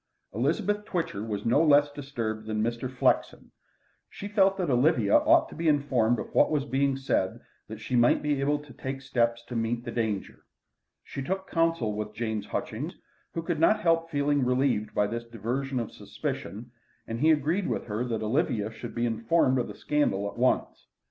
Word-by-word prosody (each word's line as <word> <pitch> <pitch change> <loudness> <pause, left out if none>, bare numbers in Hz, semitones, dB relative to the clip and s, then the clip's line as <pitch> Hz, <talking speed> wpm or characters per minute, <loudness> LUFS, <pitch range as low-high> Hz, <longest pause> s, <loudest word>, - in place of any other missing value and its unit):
Elizabeth 190 - 0
Twitcher 165 - -3
was 105 -2 -4
no 125 +7 +4
less 145 -1 +5
disturbed 115 -7 -4
than 110 0 -1
Mr. 120 +2 -2
Flexen. 130 - 0 0.6
She 200 - -7
felt 195 -2 +3
that 180 -7 0
Olivia 125 -5 +3
ought - - +5
to - - -11
be 165 +1 -2
informed 135 -6 +2
of - - -6
what - - +5
was 150 -3 0
being 135 0 +1
said 115 -8 -1 0.3
that 110 - -7
she 115 +3 -3
might 120 0 +4
be 145 -2 0
able 145 +2 +1
to 145 -2 -13
take 135 0 -5
steps 120 -2 0
to 120 - -7
meet 115 +1 -1
the 120 - -4
danger. 110 -4 -3 0.6
She 135 - -6
took 190 +7 -3
counsel 165 -10 +1
with 105 0 -5
James 110 -3 -3
Hutchings, - - -4 0.4
who 165 - -2
could 165 -2 -2
not 215 +6 +4
help 165 -2 +2
feeling 145 -2 +1
relieved 125 -4 +1
by 105 - +3
this 115 +3 -3
diversion 120 +4 -3
of 115 - -4
suspicion, 115 +4 -6 0.3
and 115 +1 -5
he 155 - +4
agreed 160 +5 +2
with - - -2
her 110 +1 -2
that 115 -3 -2
Olivia 110 -3 0
should 110 - -8
be 120 0 0
informed 125 +4 +2
of 120 - -1
the - - -8
scandal 100 -10 0
at - - -7
once. 125 +2 0
125 Hz, 190 wpm, -28 LUFS, 115-150 Hz, 0.6 s, less